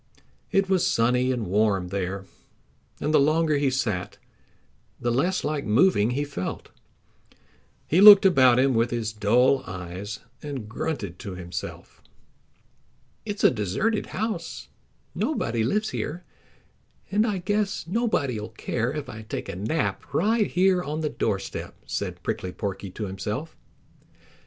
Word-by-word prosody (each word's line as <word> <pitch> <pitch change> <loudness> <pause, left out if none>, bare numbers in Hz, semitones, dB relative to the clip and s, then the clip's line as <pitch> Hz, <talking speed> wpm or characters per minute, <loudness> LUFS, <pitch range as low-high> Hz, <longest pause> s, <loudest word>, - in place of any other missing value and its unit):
It 195 0 +2
was 185 -2 +2
sunny 125 +2 +2
and 120 -4 -2
warm 100 -1 +1
there, 95 0 -3 0.7
and 155 - -1
the - - +6
longer 155 +1 +3
he 140 -1 +2
sat 110 -9 -2 0.8
the 120 - 0
less 175 +10 +1
like 150 -1 -1
moving 115 - +3
he 145 - +1
felt. 140 -11 -5 1.2
He 175 +5 +3
looked 205 -1 +11
about 130 -9 +6
him 135 +1 +3
with 115 +1 +2
his 115 -2 -2
dull 120 +6 +3
eyes 90 +3 -6 0.2
and 140 -7 -6
grunted 110 - -4
to 95 -2 -6
himself. 90 -1 -7 1.3
"It's 205 0 -4
a - - +7
deserted 120 - -1
house. 220 +2 -4 0.4
Nobody 115 - -1
lives 210 - 0
here, 170 +4 -4 0.9
and 210 +2 +3
I 205 -3 0
guess 205 +2 -1
nobody'll 165 - -1
care 115 +2 -2
if 150 -1 -5
I 110 - -8
take 110 - -6
a - - -5
nap 110 - -2
right 215 +4 +2
here 185 0 +3
on 155 -1 -3
the 155 - 0
doorstep," 100 -8 -3
said - - -4
Prickly 90 - -3
Porky 100 0 -5
to 105 +4 -5
himself. 105 +10 -5
130 Hz, 135 wpm, -25 LUFS, 105-175 Hz, 1.3 s, looked